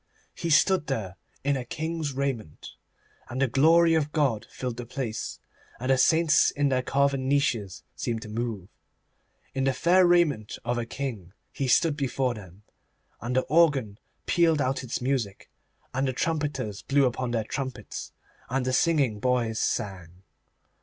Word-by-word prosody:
He 170 - -4
stood 165 +2 +4
there 105 -9 -3 0.3
in 140 +1 +2
a 130 - -3
king's 160 +2 -3
raiment, 130 - -4 0.6
and 125 - -4
the 135 - +3
Glory 165 +6 +5
of 150 -2 +1
God 140 -9 0
filled 125 -2 -5
the 120 - -5
place, 120 -4 -4 0.4
and 130 +2 0
the 135 - +4
saints 160 +1 +4
in 145 -1 0
their 130 -1 +1
carven 135 0 +1
niches 115 - 0
seemed 115 -1 -3
to - - -9
move. 110 -4 -4 0.9
In 135 0 0
the 135 - +2
fair 175 +7 +4
raiment 155 -11 +2
of 120 0 0
a 115 - -4
king 115 -9 -5 0.2
he 135 - -2
stood 155 +4 +3
before 135 -3 -1
them, 100 -2 -12 0.6
and 120 +3 -3
the 130 - +4
organ 140 -9 +2 0.3
pealed 165 -3 +3
out 135 0 0
its 125 -1 -4
music, 125 -6 -2 0.4
and 135 +1 0
the 130 - -1
trumpeters 145 -8 -2
blew 140 0 +2
upon 125 0 -1
their 115 -2 0
trumpets, 130 +2 -5 0.4
and 130 0 0
the 130 - 0
singing 140 -8 +2
boys 120 -2 0
sang. 90 -2 -3
130 Hz, 160 wpm, -27 LUFS, 115-145 Hz, 0.9 s, Glory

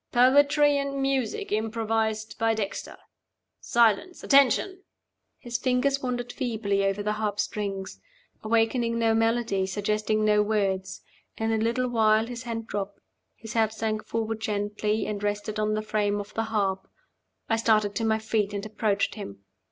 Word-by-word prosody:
"Poetry 285 +3 +5
and 280 0 -3
music 270 -4 -1
improvised 220 0 -1
by 225 0 +2
Dexter. 205 -2 -4 0.6
Silence! 235 - +2
Attention!" 280 - +3 0.6
His 240 -1 -4
fingers 270 +2 +1
wandered 245 -1 -3
feebly 210 -5 -1
over 195 +1 0
the 210 - 0
harpstrings, 205 -2 -3 0.4
awakening 230 +1 +1
no 225 -1 +2
melody, 225 -4 +1
suggesting 215 +2 0
no 210 0 +4
words. 200 -3 -1 0.3
In 225 0 -1
a 225 - +2
little 235 +3 0
while 220 -2 +3
his 240 0 -6
hand 230 -2 -4
dropped; 200 -1 -5 0.4
his 225 0 -9
head 220 -1 +2
sank 220 -1 -2
forward 225 -1 -2
gently, 210 0 -1
and 205 -1 -4
rested 205 +1 -2
on 215 0 +1
the 215 - -2
frame 205 -1 0
of 205 0 -8
the 225 - -1
harp. 195 -4 -1 0.6
I 225 - +1
started 215 -2 +2
to - - -1
my 220 -1 +2
feet, 215 -2 -1
and 200 +1 -4
approached 210 -1 0
him. 100 - -9
220 Hz, 150 wpm, -26 LUFS, 210-230 Hz, 0.6 s, Poetry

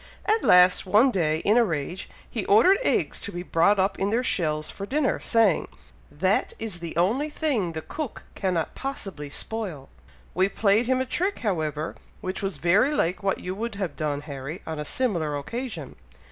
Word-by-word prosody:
At 435 +1 +2
last, 180 +1 +6
one 215 +8 +5
day, 160 -6 0
in 210 +3 +4
a 240 - +6
rage, 170 -1 -3 0.2
he 225 - -4
ordered 360 - +5
eggs - - +1
to 200 - -6
be 175 -1 -5
brought 180 +4 +3
up 195 +1 +1
in 195 - +1
their 235 +4 +1
shells 155 -9 0
for 200 - -7
dinner, 285 +1 +1
saying, 225 -7 +2 0.4
'that 185 +7 0
is 215 -6 -4
the 170 -1 -6
only 235 - +2
thing 260 - -1
the 160 -1 -5
cook 300 -7 -6
cannot 180 -5 -1
possibly 195 - -5
spoil.' 180 -5 -4 0.4
We 185 +2 +2
played 210 +3 +2
him 260 0 +2
a - - -1
trick, 370 +9 -1
however, 155 -5 -1 0.2
which 185 +1 -4
was 195 -2 -3
very 200 - +3
like 180 -5 0
what 195 -1 -1
you 180 - -4
would 225 +2 -4
have 190 -6 -3
done, 145 -2 -2
Harry, 145 +3 -7
on 160 -1 -5
a 150 - -4
similar 170 - -1
occasion. 235 - -5
195 Hz, 185 wpm, -25 LUFS, 165-230 Hz, 0.4 s, last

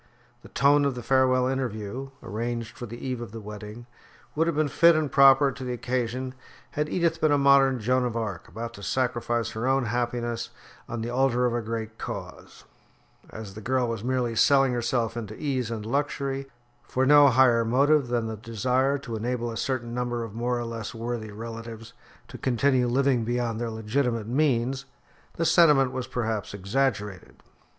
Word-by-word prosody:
The - - -14
tone 145 +1 +4
of 140 -2 0
the 120 - -6
farewell 130 -1 +3
interview, 130 -1 -3
arranged 115 +3 -4
for 120 - -7
the 120 +2 -8
eve 125 -2 -3
of 120 - -7
the 115 - -7
wedding, 105 +2 -9 0.5
would 160 +2 +1
have 170 - 0
been 155 0 +2
fit 170 +4 +5
and 155 -3 0
proper 135 0 +6
to 130 - -9
the 125 -1 -3
occasion 125 +1 -2 0.4
had 150 +1 -2
Edith 165 -2 0
been 155 - +3
a 145 - +4
modern 140 -2 +4
Joan 125 +3 +1
of 120 -1 -2
Arc 105 -7 -4
about 115 +1 -6
to 100 - -11
sacrifice 120 0 -1
her 110 +3 -3
own 135 -1 +2
happiness 120 0 -2 0.4
on 120 -1 -4
the 115 +1 -3
altar 125 -1 +2
of 120 - +1
a 120 - -1
great 110 0 -5
cause; - - -8 0.7
as 110 -3 -8
the 110 - -9
girl 125 +2 0
was 115 -2 -4
merely 125 -2 -1
selling 135 +2 +4
herself 120 -1 -1
into 110 -2 -6
ease 130 -6 -2
and 110 -2 -5
luxury, 135 +1 -2 0.3
for 130 +1 -1
no 145 +1 +7
higher 125 -3 +4
motive 140 +4 +3
than 120 -1 -1
the 110 -1 -4
desire 125 +5 0
to 120 -5 -6
enable 120 +1 -2
a - - -6
certain 125 -3 -2
number 120 -1 -2
of 115 -3 -7
more 120 +2 -1
or 120 - -3
less 115 -1 -6
worthy 115 -1 -4
relatives 115 +1 -8 0.3
to - - -10
continue 130 0 +2
living 130 -1 +2
beyond 120 -1 -2
their 120 - -2
legitimate 115 +1 -1
means, 130 -1 +1 0.5
the 165 - -2
sentiment 150 -7 +5
was 130 -1 -4
perhaps 110 -4 -3
exaggerated. 105 -2 -2
120 Hz, 180 wpm, -26 LUFS, 115-135 Hz, 0.7 s, no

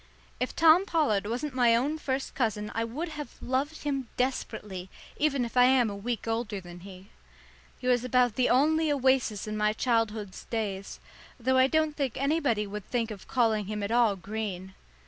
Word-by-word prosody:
If 250 - -2
Tom 330 +4 +6
Pollard 215 - +1
wasn't 255 +6 -3
my 240 -2 +4
own 290 +7 0
first 265 -2 -3
cousin 215 -4 -1
I 230 - -1
would 285 +10 -4
have 300 -5 -7
loved 275 +5 -2
him 275 -4 -2
desperately, 210 -7 -3 0.3
even 280 -4 +1
if 235 - -8
I 250 0 +7
am 250 -4 +4
a - - -5
week 230 +3 -4
older 225 -2 -2
than 175 -1 -11
he. 190 +1 -12 0.7
He - - -11
was 250 -1 +3
about 250 -2 +2
the 250 +2 +1
only 310 +4 +3
oasis 260 -7 +1
in 215 0 -4
my 210 0 +1
childhood's 220 -4 -1
days, 200 -4 -4 0.4
though 260 +2 +2
I 260 - +6
don't 310 +1 +1
think 275 -6 -2
anybody 275 -6 +1
would 205 0 -7
think 235 -2 -1
of 200 -3 -9
calling 220 -5 +1
him 210 0 -3
at 200 - -3
all 235 -4 +4
green. 190 -1 -5
240 Hz, 185 wpm, -28 LUFS, 210-265 Hz, 0.7 s, I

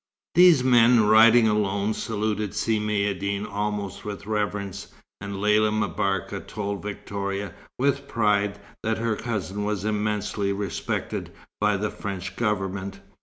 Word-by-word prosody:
These 175 -6 +7
men, 120 -2 +5
riding 110 +2 +7
alone, 105 0 +1
saluted 105 -2 -2
Si 110 0 +1
Maïeddine 100 -1 -1
almost 100 -1 -3
with 100 -1 -6
reverence, 105 -3 -2 0.3
and 100 0 -6
Lella 105 +1 +3
M'Barka 100 -2 -1
told 100 -1 -5
Victoria, 100 -1 -4 0.2
with 140 +1 0
pride, 105 -3 +1 0.2
that 110 0 -1
her 115 -1 0
cousin 105 -3 -3
was 105 -1 -2
immensely 105 -1 -1
respected 100 0 -3 0.3
by 105 -1 +2
the 105 +1 -2
French 95 -2 -5
Government. 100 -3 -2
105 Hz, 120 wpm, -25 LUFS, 100-110 Hz, 0.3 s, These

